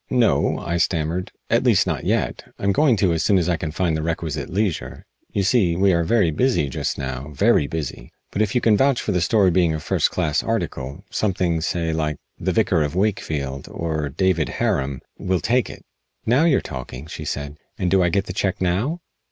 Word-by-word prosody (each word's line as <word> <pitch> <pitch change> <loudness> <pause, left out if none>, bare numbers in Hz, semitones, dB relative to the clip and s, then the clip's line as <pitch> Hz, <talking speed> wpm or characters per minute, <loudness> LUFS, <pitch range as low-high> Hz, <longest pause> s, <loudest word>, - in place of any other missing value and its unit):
"No," 125 -3 +2
I 85 - -2
stammered. 85 +1 -1 0.2
"At - - +4
least, - - +4
not - - -2
yet. - - -1
I'm 100 - +1
going 135 +4 +4
to 95 -4 +2
as 80 - 0
soon 100 +3 +3
as 90 -2 +1
I 90 - +2
can 80 0 -4
find 85 +1 0
the 80 - -1
requisite 80 -1 -3
leisure. 100 -2 -2 0.3
You 100 - 0
see, 95 -5 +3
we 95 +1 +3
are 85 0 +2
very 100 -2 +2
busy 80 - +1
just - - -2
now 65 0 -4
very 70 - +3
busy. 80 -1 -5 0.2
But 100 - -1
if 105 +1 0
you 125 - +3
can 110 -2 +4
vouch 135 +2 +3
for - - -2
the 90 -2 +1
story 95 +1 +3
being 85 -2 +2
a - - -3
first - - +1
class 75 - 0
article 75 - -3
something, 90 -5 0
say, 85 -1 -1
like 75 -2 -1 0.2
'The - - 0
Vicar 80 - +2
of 75 +2 -1
Wakefield' 75 -9 -1
or 80 -3 -2
'David 85 +1 +1
Harum' 65 -1 -1 0.2
we'll 95 -1 0
take 120 +6 +1
it." - - -11 0.4
"Now 130 +8 +4
you're 160 -5 +3
talking," 65 +1 -7
she - - -7
said. 70 +1 -4 0.2
"And 90 - -1
do 95 -1 +4
I 90 - +3
get 100 +2 0
the 90 - -6
check 95 0 -1
now?" 105 - 0
85 Hz, 210 wpm, -22 LUFS, 80-100 Hz, 0.4 s, At